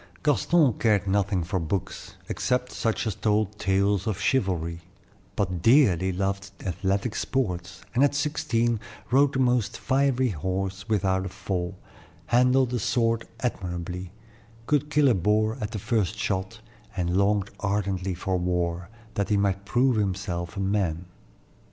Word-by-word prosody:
Gaston 150 Hz, -2 st, +3 dB
cared 105 Hz, -4 st, +3 dB
nothing 100 Hz, -2 st, +1 dB
for 95 Hz, +3 st, -1 dB
books, 85 Hz, +3 st, -4 dB
except 125 Hz, 0 st, -1 dB
such 115 Hz, 0 st, -1 dB
as 110 Hz, -, -1 dB
told 105 Hz, 0 st, 0 dB
tales 100 Hz, +1 st, +1 dB
of 105 Hz, -3 st, -1 dB
chivalry; 90 Hz, -10 st, 0 dB, 0.6 s
but 90 Hz, -4 st, -1 dB
dearly 95 Hz, -, +4 dB
loved 100 Hz, +1 st, -2 dB, 0.2 s
athletic 95 Hz, +5 st, -1 dB
sports, 90 Hz, -9 st, -2 dB
and 125 Hz, +4 st, +3 dB
at 145 Hz, 0 st, +3 dB
sixteen 120 Hz, -6 st, 0 dB, 0.3 s
rode 140 Hz, +2 st, +4 dB
the -, -, -1 dB
most 125 Hz, -4 st, +1 dB
fiery 130 Hz, -1 st, +2 dB
horse 95 Hz, +3 st, -3 dB
without 95 Hz, -3 st, +1 dB
a -, -, -6 dB
fall, 90 Hz, -1 st, -4 dB, 0.5 s
handled 125 Hz, +1 st, +3 dB
a 120 Hz, -, 0 dB
sword 115 Hz, +1 st, +1 dB
admirably, 90 Hz, -5 st, -4 dB, 0.5 s
could 150 Hz, +1 st, +1 dB
kill 150 Hz, -2 st, +4 dB
a 125 Hz, -, +5 dB
boar 110 Hz, +3 st, +2 dB
at 105 Hz, -, -2 dB
the 110 Hz, -, -5 dB
first 110 Hz, -1 st, 0 dB
shot, 105 Hz, 0 st, -2 dB, 0.4 s
and 90 Hz, -1 st, 0 dB
longed 100 Hz, 0 st, +2 dB
ardently 100 Hz, -2 st, -1 dB
for 95 Hz, +2 st, -1 dB
war, 90 Hz, 0 st, -1 dB, 0.2 s
that 100 Hz, +1 st, -1 dB
he 105 Hz, -, +3 dB
might 100 Hz, -1 st, 0 dB
prove 125 Hz, +2 st, +2 dB
himself 95 Hz, -2 st, -2 dB
a -, -, -2 dB
man. 95 Hz, -4 st, 0 dB
100 Hz, 145 wpm, -26 LUFS, 95-120 Hz, 0.6 s, a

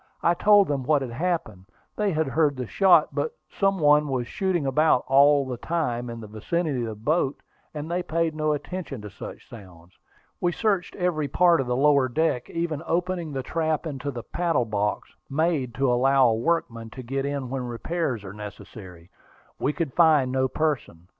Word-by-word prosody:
I 170 Hz, -, +4 dB
told 205 Hz, +2 st, +5 dB
them 140 Hz, -2 st, -1 dB
what 140 Hz, +2 st, +2 dB
had 125 Hz, -, -6 dB
happened. 120 Hz, -, -3 dB, 0.3 s
They 210 Hz, -2 st, 0 dB
had 160 Hz, -1 st, 0 dB
heard 145 Hz, 0 st, +1 dB
the 125 Hz, -, -3 dB
shot; 190 Hz, -, +4 dB
but 475 Hz, 0 st, -2 dB, 0.2 s
some 195 Hz, -1 st, +1 dB
one 150 Hz, -2 st, +4 dB
was 130 Hz, -3 st, -1 dB
shooting 180 Hz, +2 st, -1 dB
about 135 Hz, 0 st, +3 dB
all 140 Hz, +1 st, +5 dB
the 125 Hz, -2 st, -5 dB
time 125 Hz, -6 st, -2 dB
in 115 Hz, 0 st, -6 dB
the -, -, -8 dB
vicinity 135 Hz, +6 st, -2 dB
of 115 Hz, -, -2 dB
the 110 Hz, -, -5 dB
boat, 140 Hz, +5 st, 0 dB, 0.3 s
and 155 Hz, +2 st, -6 dB
they 180 Hz, +1 st, 0 dB
paid 165 Hz, -1 st, -1 dB
no 155 Hz, 0 st, 0 dB
attention 150 Hz, -, -6 dB
to 105 Hz, -, -8 dB
such -, -, -10 dB
sounds. 90 Hz, -5 st, -14 dB, 0.5 s
We 175 Hz, 0 st, 0 dB
searched 200 Hz, -4 st, -1 dB
every 175 Hz, -5 st, -1 dB
part 170 Hz, +2 st, +4 dB
of 130 Hz, -, -5 dB
the 125 Hz, -, 0 dB
lower 140 Hz, -1 st, +3 dB
deck, 130 Hz, -2 st, 0 dB
even 165 Hz, -3 st, -3 dB
opening 175 Hz, -1 st, -1 dB
the 135 Hz, -1 st, -3 dB
trap 160 Hz, +2 st, -1 dB
into 145 Hz, -2 st, -4 dB
the 120 Hz, -4 st, -6 dB
paddle 170 Hz, -8 st, 0 dB
box, 105 Hz, -1 st, -2 dB, 0.2 s
made 145 Hz, -4 st, 0 dB
to 135 Hz, -1 st, +2 dB
allow 135 Hz, +1 st, +4 dB
a -, -, +2 dB
workman 115 Hz, -4 st, -1 dB
to 130 Hz, -, -6 dB
get 135 Hz, +3 st, -2 dB
in 140 Hz, -3 st, -3 dB
when 130 Hz, -2 st, -3 dB
repairs 125 Hz, -, -3 dB
were 95 Hz, -1 st, -8 dB
necessary. 100 Hz, -4 st, -11 dB, 0.5 s
We 140 Hz, -, +1 dB
could 155 Hz, -4 st, -3 dB
find 155 Hz, -6 st, +4 dB
no 130 Hz, 0 st, +1 dB
person. 130 Hz, -, -3 dB
140 Hz, 190 wpm, -25 LUFS, 120-165 Hz, 0.5 s, told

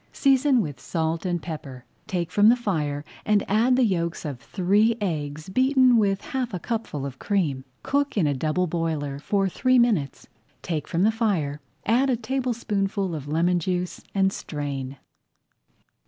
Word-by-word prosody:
Season 270 Hz, -2 st, +3 dB
with 145 Hz, -8 st, -5 dB
salt 165 Hz, +1 st, -2 dB
and 175 Hz, -2 st, -2 dB
pepper, 140 Hz, -6 st, -7 dB, 0.2 s
take 175 Hz, -2 st, -2 dB
from 210 Hz, +1 st, +5 dB
the 240 Hz, -, +6 dB
fire 150 Hz, -11 st, -2 dB, 0.2 s
and 210 Hz, -1 st, +2 dB
add 230 Hz, +5 st, +3 dB
the 260 Hz, -, +3 dB
yolks 170 Hz, -6 st, -1 dB
of 140 Hz, -5 st, -4 dB
three 210 Hz, +7 st, +2 dB
eggs 155 Hz, -6 st, -3 dB
beaten 255 Hz, +4 st, +4 dB
with 200 Hz, -3 st, +2 dB
half 260 Hz, -8 st, -3 dB
a -, -, -3 dB
cupful 195 Hz, -, -3 dB
of 130 Hz, -2 st, -7 dB
cream. 150 Hz, -10 st, -1 dB, 0.2 s
Cook 285 Hz, -3 st, 0 dB
in 185 Hz, -, +3 dB
a 145 Hz, -, +2 dB
double 155 Hz, +6 st, 0 dB
boiler 155 Hz, -4 st, -2 dB
for 195 Hz, +6 st, +1 dB
three 255 Hz, +7 st, +2 dB
minutes, 210 Hz, -, +1 dB, 0.4 s
take 155 Hz, -4 st, -3 dB
from 170 Hz, +2 st, 0 dB
the 215 Hz, -, +4 dB
fire, 180 Hz, -11 st, -1 dB, 0.2 s
add 250 Hz, +5 st, +3 dB
a 255 Hz, -, +3 dB
tablespoonful 220 Hz, -6 st, -1 dB
of 145 Hz, -3 st, -5 dB
lemon 170 Hz, +4 st, +2 dB
juice 180 Hz, +1 st, -2 dB
and 195 Hz, 0 st, +3 dB
strain. 140 Hz, -3 st, -5 dB
185 Hz, 160 wpm, -25 LUFS, 155-225 Hz, 0.4 s, the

